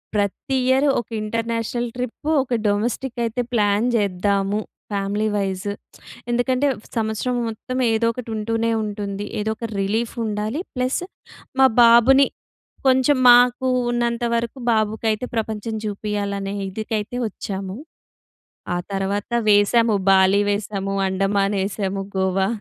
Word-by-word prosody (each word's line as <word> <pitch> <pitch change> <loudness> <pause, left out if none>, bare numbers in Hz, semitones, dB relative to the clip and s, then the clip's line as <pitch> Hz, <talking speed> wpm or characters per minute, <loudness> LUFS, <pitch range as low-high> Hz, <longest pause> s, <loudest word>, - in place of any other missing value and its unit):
"ప్రతి 205 +6 -1
ఇయర్ 265 +3 +3
ఒక 235 - -6
international 230 +2 -2
trip, 250 +5 -4
ఒక 255 - -5
డొమెస్టిక్ 235 +5 -1
అయితే 230 +2 -2
ప్లాన్ 210 +1 +2
చేద్దాము. 200 0 +1 0.3
Family 200 +1 -1
vice." 195 0 -2 0.6
ఎందుకంటే 255 +3 +1 0.3
సంవత్సరం 220 +3 -1
మొత్తం 255 +4 -5
ఏదో 225 +1 +2
ఒకటి 245 -1 -7
ఉంటూనే 225 +1 -1
ఉంటుంది. 205 -1 -4 0.2
ఏదో 220 +1 -1
ఒక 230 - -4
రిలీఫ్ 220 +4 -1
ఉండాలి. 215 +8 -2
ప్లస్ 255 +4 0 0.6
మా 265 - +8 0.2
బాబుని 240 +4 +6 0.6
కొంచెం 260 +2 +4
మాకు 245 +1 +5 0.2
ఉన్నంత 240 0 -1
వరకు 235 +3 -2
బాబుకైతే 220 +1 0
ప్రపంచం 220 0 -3
చూపియాలనే 200 -1 -3 0.2
ఇదికైతే 215 +3 -3
వచ్చాము. 195 -1 -6 1.0
ఆ - - 0 0.2
తర్వాత 195 +3 -2 0.2
వేసాము. 210 +2 +4
బాలి 190 +1 +5
వేసాము, 200 -1 -2
అండమానేసాము, 195 0 0
గోవా. 190 0 +1
215 Hz, 110 wpm, -22 LUFS, 200-235 Hz, 1.0 s, మా